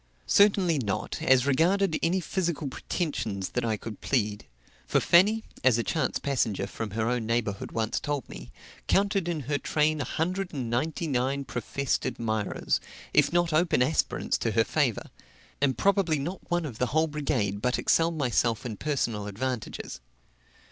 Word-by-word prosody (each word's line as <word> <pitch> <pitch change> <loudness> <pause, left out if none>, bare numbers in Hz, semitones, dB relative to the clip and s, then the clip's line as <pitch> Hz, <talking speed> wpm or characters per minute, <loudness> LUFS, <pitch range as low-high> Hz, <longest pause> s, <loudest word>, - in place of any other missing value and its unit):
Certainly 195 -6 +4
not, 105 -6 -3
as 130 -1 +4
regarded 165 +6 +2
any 175 +3 +2
physical 170 -4 -2
pretensions 115 - -3
that 125 - -2
I 110 -2 0
could 105 0 -8
plead; 105 - -1 0.4
for - - +3
Fanny 210 +6 +4 0.2
(as 130 -3 +5
a 115 - 0
chance 150 -2 0
passenger 115 -8 0
from 110 +2 -5
her 110 0 +1
own 120 -2 -1
neighborhood 115 -4 -1
once 110 -1 -1
told 145 -4 -3
me) - - -10 0.4
counted 195 -2 +2
in 165 -3 -1
her 145 +2 -1
train 155 +1 +1
a - - 0
hundred 185 +3 -2
and 125 -4 -3
ninety 155 +7 -1
nine 135 0 0
professed 135 +3 -2
admirers, 110 -3 -1 0.3
if 145 -1 +4
not 175 -1 +2
open 155 -5 +3
aspirants 155 +5 0
to - - -1
her - - +4
favor; - - -1 0.5
and 135 -2 +2
probably 195 -5 +2
not 170 +7 -5
one 175 -2 0
of 125 -7 -7
the 125 - +1
whole 155 +5 +2
brigade 135 -10 -1
but 125 +1 +1
excelled 165 0 +2
myself 120 -4 +1
in 110 -4 -4
personal 120 -8 -1
advantages. 110 - -4
140 Hz, 160 wpm, -27 LUFS, 115-165 Hz, 0.5 s, as